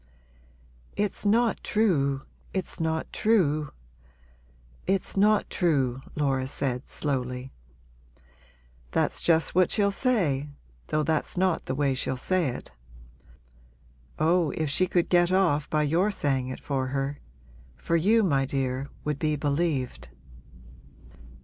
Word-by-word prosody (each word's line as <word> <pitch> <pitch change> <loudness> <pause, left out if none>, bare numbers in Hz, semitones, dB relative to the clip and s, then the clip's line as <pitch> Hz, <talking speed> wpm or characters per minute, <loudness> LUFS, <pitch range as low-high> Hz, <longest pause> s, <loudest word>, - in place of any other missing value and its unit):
'It's 210 0 -1
not 230 +2 +2
true 140 -11 +1 0.3
it's 190 -2 -3
not 160 -1 -2
true 155 -9 +2 1.2
it's 190 0 0
not 210 +1 +3
true,' 135 -7 0
Laura 135 -3 0
said, 130 -2 -2
slowly. 130 -2 -2 1.4
'That's - - 0
just 165 -1 +2
what 185 -1 +4
she'll 200 -1 +2
say 180 - 0 0.4
though 155 0 0
that's 160 +3 -1
not 185 -2 +1
the 130 - -1
way 140 -1 +1
she'll 130 0 -1
say 180 +4 +1
it. 120 - -6 1.5
Oh, 165 +1 +3
if 155 -3 -1
she 185 +5 +2
could 175 -1 +1
get 175 0 +3
off 170 -6 +2
by 155 0 +1
your 170 +7 +2
saying 135 -9 0
it 130 - -6
for 135 -2 -2
her! 135 +2 -2 0.6
for 170 - -1
you, 215 +7 +4
my 140 -8 +2
dear, 135 0 -2
would 150 -2 -2
be 155 -1 +1
believed.' 140 - -1
150 Hz, 125 wpm, -27 LUFS, 135-185 Hz, 1.5 s, what